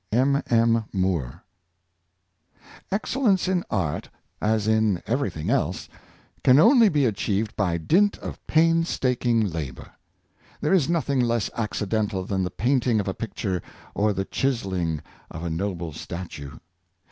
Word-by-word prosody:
'' - - -49
— - - -43
M. 135 +5 +3
M. 115 -1 +3
MoORE. 90 - -1 1.5
XCELLENCE 210 -1 +1
in 180 -2 +1
art, 90 -8 -2 0.3
as 110 0 +1
in 110 -5 +2
everything 105 - -1
else, - - 0 0.6
can 130 0 +6
only 230 - +7
be 145 -5 +2
achieved 105 -1 -1
by 90 -5 0
dint 190 - +2
of - - -7
painstaking 130 -8 +2
labor. 80 -7 -6 0.7
There 150 - +1
is 170 -6 +3
nothing 150 -5 +1
less 120 -3 +1
accidental 105 -3 -1
than 95 -1 -1
the 90 - -1
painting 120 +2 +1
of 100 - -2
a 95 - -1
picture 95 -4 -3 0.3
or 105 +1 +2
the 95 -1 -2
chiselling 95 - -1 0.3
of 80 - -7
a 85 - -2
noble 85 -2 -3
statue. 75 -4 -7
110 Hz, 135 wpm, -25 LUFS, 90-135 Hz, 1.5 s, only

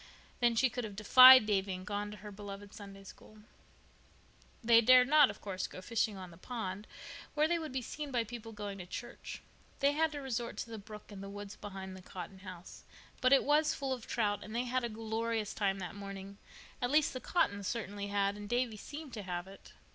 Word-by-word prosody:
Then 240 -1 +3
she 260 +4 +4
could 245 0 -4
have 210 -3 -6
defied 255 +3 +9
Davy, 195 -2 0
and 185 0 -8
gone 205 +1 -3
to 210 - -9
her 210 0 -9
beloved 200 0 -9
Sunday 200 -2 -10
School. 215 +2 -14 1.3
They 230 0 +7
dared 250 +2 +7
not, 295 -1 +7
of - - -8
course, 190 -2 -3
go - - -10
fishing 215 +1 -1
on 185 -2 -8
the 165 - -14
pond, 210 -3 -5 0.5
where 305 +1 +3
they 340 +1 +1
would 315 -3 -5
be 260 -1 -3
seen 295 +4 -6
by 245 -3 +1
people 225 0 -8
going 205 -2 -6
to 180 - -8
church. 240 +6 -7 0.4
They 280 0 +4
had 315 +2 +1
to 290 - -4
resort 240 -4 -3
to 230 - -5
the 225 - -6
brook 210 +1 -11
in 200 -2 -8
the 195 - -7
woods 205 0 -8
behind 190 -2 -8
the 185 - -10
Cotton 185 +1 -9
house. 185 -2 -10 0.4
But 255 - +4
it 275 - +6
was 300 +1 +3
full 270 -1 -2
of 245 -3 -7
trout, 205 -3 0
and 215 - -8
they 240 - +1
had 255 0 -1
a 235 - -1
glorious 225 0 -2
time 195 -2 0
that 180 -2 -6
morning—at 200 +4 -8
least 300 +2 +3
the 255 - -4
Cottons 200 - 0
certainly 205 -3 -3
had, 200 0 +1
and 205 0 -8
Davy 240 -2 0
seemed 290 +4 -8
to 215 - -5
have 180 -2 -4
it. 195 +1 -14
215 Hz, 215 wpm, -33 LUFS, 200-250 Hz, 1.3 s, defied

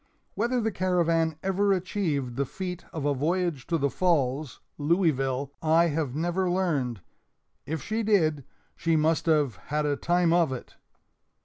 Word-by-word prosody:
Whether 240 +3 0
the 225 -1 0
Caravan 170 -4 +1
ever 195 +1 +2
achieved 165 -9 -2
the 140 +1 -1
feat 180 +1 -6
of 160 -4 -4
a 145 - +2
voyage 165 0 -1
to 170 - +1
the 140 -2 0
Falls 145 -6 0 0.2
(Louisville) 140 -5 +1
I 165 +2 +4
have 145 -4 -2
never 175 +3 0
learned; 145 - 0 0.7
if 160 -1 -3
she 220 +1 -1
did, 160 -10 +2 0.3
she 165 -1 +1
must 160 +2 +1
have 145 - +2
"had 150 +1 0
a 145 -1 +1
time 175 +2 +2
of 170 -5 +3
it!" 130 - -7
165 Hz, 150 wpm, -27 LUFS, 145-180 Hz, 0.7 s, I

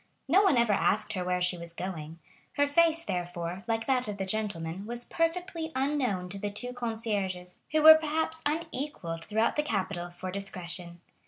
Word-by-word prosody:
No 390 - +5
one 380 -10 +4
ever 235 -3 +4
asked 215 +2 +1
her 185 -3 -2
where 180 0 0
she 180 -1 +1
was 170 0 -6
going. 165 -3 -6 0.4
Her 285 - +3
face, 330 +3 +3
therefore, 175 +1 -3
like 225 0 0
that 255 -3 +3
of 205 -1 -4
the 195 - -2
gentleman, 190 -3 -2
was 240 +1 -3
perfectly 330 0 -1
unknown 260 -9 0
to 195 +2 -7
the 205 +1 -2
two 245 +5 -4
concierges, 210 -7 -3
who 310 0 +2
were 315 0 +13
perhaps 320 +1 0
unequalled 290 - -3
throughout 220 +5 +1
the - - +4
capital 195 -9 -2
for 180 +1 -6
discretion. 180 -3 -5
210 Hz, 175 wpm, -29 LUFS, 180-290 Hz, 0.4 s, were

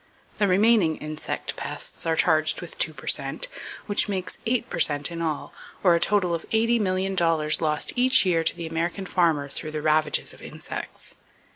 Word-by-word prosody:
The 205 - +3
remaining 195 -3 +3
insect 155 0 -5
pests - - -6
are 165 - +1
charged 155 -1 +2
with - - -9
two - - +3
per - - -13
cent, - - +2 0.4
which 205 0 +2
makes 185 -2 -3
eight 245 +1 0
per - - -5
cent 145 0 +3
in 170 0 -5
all, 155 -3 -3 0.3
or 180 -3 +5
a 170 - +2
total 190 -2 +1
of 165 - -5
$80,000,000 185 -8 +1
lost 150 -2 0
each 255 -2 +5
year 170 -3 +1
to 165 - 0
the 170 - -6
American 170 +4 -3
farmer 165 -6 +1
through 145 +2 -7
the 155 0 -5
ravages 155 0 +1
of - - -17
insects. - - -8
170 Hz, 175 wpm, -24 LUFS, 155-195 Hz, 0.4 s, or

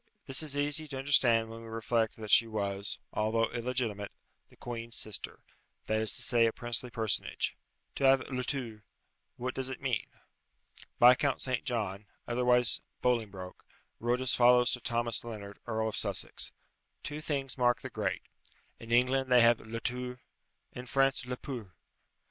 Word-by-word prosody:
This 135 +2 +1
is 145 -2 -2
easy 145 +2 +1
to 140 -2 -5
understand 120 -5 +3
when 115 0 -8
we 115 - -10
reflect 115 0 0
that 110 -1 -5
she 115 - +7
was, 100 -2 -3 0.2
although 115 +1 +1
illegitimate, 120 -4 -2 0.4
the - - -20
queen's 115 -1 -6
sister 110 - -3 0.4
that 110 0 +1
is 110 - +1
to 120 - 0
say, 120 -2 +5
a - - +1
princely 120 +2 -2
personage. 110 -3 -1 0.4
To 140 - +1
have 135 0 +6
le 125 -1 -1
tour 120 -6 -4 0.5
what 125 +1 -3
does 130 0 -3
it 130 - -5
mean? 130 -4 -1 0.9
Viscount 125 +3 +6
St. 130 -2 -1
John, 105 -6 -2 0.2
otherwise 125 0 +3 0.2
Bolingbroke, 105 -7 -1 0.4
wrote 120 +2 0
as 130 - +2
follows 125 0 +5
to 125 - -2
Thomas 115 -1 -1
Lennard, 105 -4 -8
Earl 110 -1 0
of - - -4
Sussex: - - -1 0.5
"Two 150 +1 -5
things 140 -4 -1
mark 120 -2 +2
the - - -7
great - - -2 0.6
in 115 0 -10
England, 130 +2 +3
they 125 -1 +7
have 115 0 +5
le 115 +1 -6
tour; 125 +1 -4 0.5
in 125 0 -8
France, 135 0 +1
le 125 0 -3
pour." 115 - -7
120 Hz, 160 wpm, -31 LUFS, 110-130 Hz, 0.9 s, she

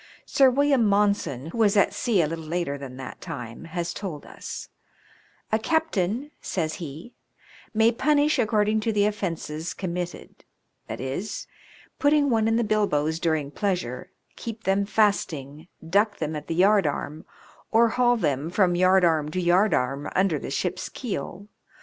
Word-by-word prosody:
Sir 270 -1 +5
William 275 -1 +3
Monson, 200 - +1
who 230 - -5
was 210 -2 +4
at 200 - +4
sea 210 -8 +2
a - - 0
little 165 +1 -5
later 170 -3 -2
than 135 -2 -8
that 130 -1 -8
time, 125 -5 -7
has 170 0 -3
told 175 -8 -6
us: - - -8 0.8
"A 220 - +3
captain," 275 - 0
says 160 -4 -2
he, 160 - -8 0.6
"may 225 +1 +4
punish 295 +3 +2
according 215 -2 +2
to 225 +1 0
the 205 -1 +2
offences 170 -6 -3
com 185 -3 -4
mitted, 175 0 -6 0.4
viz., 135 - -4 0.5
putting 290 -1 +3
one 220 -1 +2
in 225 - +2
the 235 - +2
bilboes 165 -8 +1
during 160 -4 0
pleasure, 175 - -2 0.3
keep 225 -1 -7
them 195 +1 +1
fasting, 160 -8 0 0.2
duck 205 +4 +2
them 155 -1 -3
at 150 0 -6
the 165 - -2
yardarm, 180 -5 +2 0.5
or 230 +1 +4
haul 245 +1 +3
them 145 - -1
from 180 0 +3
yardarm 175 -4 +3
to 185 - -2
yardarm 175 -7 +2
under 185 -6 +2
the - - -6
ship's 140 +7 -2
keel. 200 - -5
185 Hz, 150 wpm, -25 LUFS, 155-220 Hz, 0.8 s, Sir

